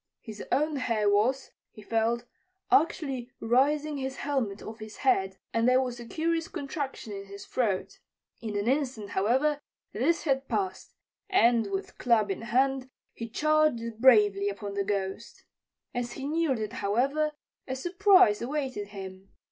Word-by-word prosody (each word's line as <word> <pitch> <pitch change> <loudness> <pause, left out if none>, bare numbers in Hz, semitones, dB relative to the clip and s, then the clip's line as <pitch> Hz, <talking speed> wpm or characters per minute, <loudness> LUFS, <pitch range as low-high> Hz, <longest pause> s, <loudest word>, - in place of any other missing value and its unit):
His 220 -3 -8
own 300 +3 +1
hair 225 -5 0
was, 225 +7 +2 0.2
he 215 - -14
felt, 230 +2 0 0.5
actually 280 -9 +2
raising 285 +6 +2
his 265 0 -3
helmet 260 -10 -2
off 220 +1 -8
his 215 0 -9
head, 195 -7 +2 0.2
and 230 +2 +3
there 255 0 +5
was 250 -2 -2
a 240 - -9
curious 330 +3 -1
contraction 275 -6 -5
in 195 0 -6
his 200 +1 -10
throat. 210 -7 -1 0.4
In 215 -3 -3
an 205 +2 -1
instant, 255 -6 0
however, 265 +9 +1 0.3
this 295 +10 +1
had 270 -3 0
passed, 385 -2 -3 0.3
and, 235 - +4
with 195 0 -5
club 220 -5 +3
in 195 - -4
hand, 260 +3 +1 0.2
he 230 0 -6
charged 255 -5 +1
bravely 205 -5 +5
upon 200 0 -6
the 200 0 0
Ghost. 195 -1 -4 0.5
As 240 -1 -3
he 270 0 -5
neared 310 -4 +1
it, 215 0 -4
however, 270 +7 0 0.3
a 260 - -2
surprise 360 - +4
awaited 260 -5 -3
him. 195 -1 -9
245 Hz, 150 wpm, -28 LUFS, 210-280 Hz, 0.5 s, there